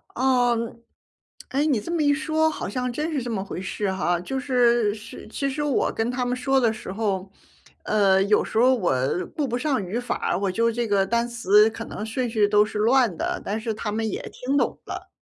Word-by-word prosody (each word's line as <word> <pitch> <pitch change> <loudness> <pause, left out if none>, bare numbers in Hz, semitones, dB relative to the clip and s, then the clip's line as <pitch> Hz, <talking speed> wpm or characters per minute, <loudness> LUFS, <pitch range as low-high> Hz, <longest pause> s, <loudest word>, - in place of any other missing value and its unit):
哦， 250 -2 +3 0.9
哎， 280 +3 +1
你 280 -7 +2
这 270 - -6
么 340 -2 0
一 290 -1 +4
说， 310 +1 +1
好 315 - -5
像 250 +5 -2
真 300 +6 -3
是 280 - 0
这 245 - -5
么 195 -4 -2
回 185 - -6
事 195 +1 -2
哈。 175 -2 0
就 265 +10 -3
是 240 -5 +2
是 215 0 -10
其 275 +5 -3
实 275 +2 -3
我 290 -4 +1
跟 225 +1 -1
他 250 0 -1
们 245 0 0
说 270 +2 +2
的 230 -3 +2
时 220 - -8
候， 195 -2 -2 0.5
呃， 195 -3 +3
有 210 +1 +3
时 - - -5
候 250 +3 +5
我 180 - +1 0.4
顾 295 -3 0
不 240 - -2
上 265 -4 0
语 205 +7 -2
法， 245 - -2
我 195 -1 -1
就 230 +4 +1
这 235 +1 -2
个 200 -2 +2
单 235 +3 0
词 215 -2 +4
可 225 +1 -7
能 - - -6
顺 245 +3 -2
序 215 -2 +2
都 210 0 +4
是 210 0 -5
乱 235 -2 +3
的， - - -2
但 210 +2 -2
是 225 0 -2
他 215 0 -4
们 220 +1 -1
也 - - -3
听 265 +3 -1
懂 - - 0
了。 - - -7
230 Hz, 240 characters per minute, -24 LUFS, 210-260 Hz, 0.9 s, 候